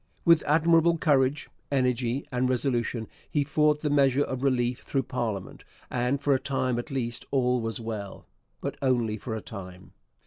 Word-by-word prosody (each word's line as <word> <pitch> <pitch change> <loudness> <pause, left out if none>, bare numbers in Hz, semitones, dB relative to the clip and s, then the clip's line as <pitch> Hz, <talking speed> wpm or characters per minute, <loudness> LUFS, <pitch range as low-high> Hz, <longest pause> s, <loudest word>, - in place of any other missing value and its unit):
With 165 -1 +6
admirable 165 +2 +4
courage, 145 -2 +2 0.2
energy, 125 -1 0
and 125 0 +1
resolution 120 -3 0 0.2
he 145 - +1
fought 150 +1 +2
the 150 - +1
measure 140 -1 +4
of 130 -2 -4
relief 125 -2 +1
through 135 -1 -1
parliament, 110 -6 -4 0.3
and 125 +3 0
for 145 0 +2
a 130 - +2
time 130 -3 -1
at 120 - -6
least 120 -4 -3
all 125 -2 +2
was 115 0 -3
well. 110 -3 -6 0.4
But - - -4
only 120 -5 +1
for 110 +1 -5
a 110 - -4
time. 95 -3 -10
130 Hz, 165 wpm, -27 LUFS, 120-140 Hz, 0.4 s, With